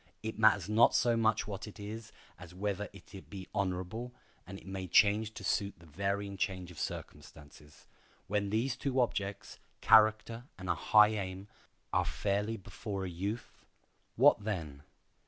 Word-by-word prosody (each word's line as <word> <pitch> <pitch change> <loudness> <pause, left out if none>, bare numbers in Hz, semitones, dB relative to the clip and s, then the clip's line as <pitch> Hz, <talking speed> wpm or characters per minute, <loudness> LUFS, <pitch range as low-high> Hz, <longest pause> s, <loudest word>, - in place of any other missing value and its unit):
It 110 0 -5
matters 110 -2 +5
not 110 +2 +5
so 120 -1 +3
much 110 -2 +2
what 100 0 -6
it 105 - -11
is 105 +2 -7 0.3
as 90 -1 -11
whether 100 +1 -2
it 95 -2 -13
be 95 -3 -8
honorable, 100 +5 -2 0.4
and 95 +1 -7
it - - -15
may 95 -1 -5
change 105 +4 +4
to - - -8
suit 100 -1 0
the 85 - -17
varying 100 +4 -3
change 90 -2 -2
of 85 - -11
circumstances. 75 0 -8 0.4
When 100 +1 -1
these 120 +5 0
two 135 0 -1
objects—character 110 +1 +2
and 95 -1 -7
a - - +4
high 105 +6 +5
aim—are 95 -2 -4
fairly 105 +3 -1
before 100 0 -6
a - - -4
youth, 100 +7 -5 0.5
what 125 -3 +5
then? 80 -10 -4
100 Hz, 150 wpm, -32 LUFS, 95-110 Hz, 0.5 s, matters